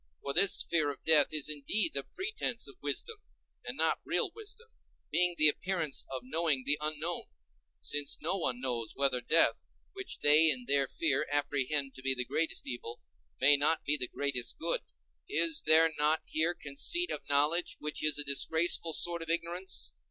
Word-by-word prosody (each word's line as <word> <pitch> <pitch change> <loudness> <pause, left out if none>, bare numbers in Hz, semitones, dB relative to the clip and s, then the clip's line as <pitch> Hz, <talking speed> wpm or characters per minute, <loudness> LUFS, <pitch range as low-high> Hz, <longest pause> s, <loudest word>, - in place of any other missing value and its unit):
For 140 - -3
this 200 +5 +4
fear 155 -4 0
of 140 - -8
death 155 -3 +5
is 155 -2 +1
indeed 150 - 0
the - - -2
pretence 375 - -4
of 140 - -11
wisdom, 145 - -4 0.5
and - - -6
not - - 0
real - - -1
wisdom, 445 +1 -10 0.4
being 180 -1 +2
the 155 - +7
appearance 165 -2 -1
of 130 -2 -6
knowing 155 -1 -1
the 145 +1 +2
unknown; 155 +3 -3 0.6
since 145 0 -1
no 165 +5 -2
one 130 -10 -2
knows 120 -3 -4
whether 135 -3 +1
death, 160 +7 +2 0.3
which 390 -1 -7
they 155 +2 +6
in 130 -4 0
their 140 +1 +1
fear 145 -2 -1
apprehend 145 -1 -1
to - - -12
be 135 0 +1
the 125 -1 -3
greatest 165 +5 -2
evil, 120 -2 -7 0.4
may 145 +3 +5
not 150 +3 0
be 150 - +2
the 125 -4 -2
greatest 125 -4 -3
good. 165 +1 -1 0.5
Is 165 -1 +3
there 160 +1 +6
not 150 +2 +2
here 165 +3 0
conceit 250 - -1
of - - -4
knowledge, 150 +5 +1
which 150 0 -5
is 155 -1 +3
a 145 - +2
disgraceful 160 +4 +2
sort 170 +1 +1
of 165 - -4
ignorance? 170 +3 -3
150 Hz, 175 wpm, -30 LUFS, 140-170 Hz, 0.6 s, the